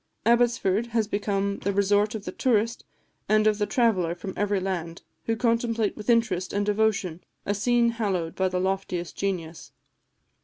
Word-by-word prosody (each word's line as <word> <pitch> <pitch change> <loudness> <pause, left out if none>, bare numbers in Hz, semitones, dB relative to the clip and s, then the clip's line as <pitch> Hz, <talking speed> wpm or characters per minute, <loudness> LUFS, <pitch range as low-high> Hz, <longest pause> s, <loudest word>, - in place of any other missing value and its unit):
Abbotsford 235 -3 +2
has 225 -2 0
become 200 -1 -1
the 200 - -1
resort 205 +2 +2
of 215 -2 -6
the - - -4
tourist 230 -2 0 0.4
and 215 0 +4
of 215 -1 +3
the 205 - +1
traveller 195 -10 +1
from 190 +2 -7
every 205 -1 0
land, 175 -3 -4 0.2
who 225 - 0
contemplate 230 -1 0
with 215 +2 -7
interest 215 -6 +1
and 205 0 0
devotion 205 -5 0 0.2
a 205 - 0
scene 235 +3 +2
hallowed 195 -8 -2
by 190 - 0
the 180 0 -1
loftiest 185 -2 -2
genius. 175 -5 -4
205 Hz, 160 wpm, -26 LUFS, 190-225 Hz, 0.4 s, and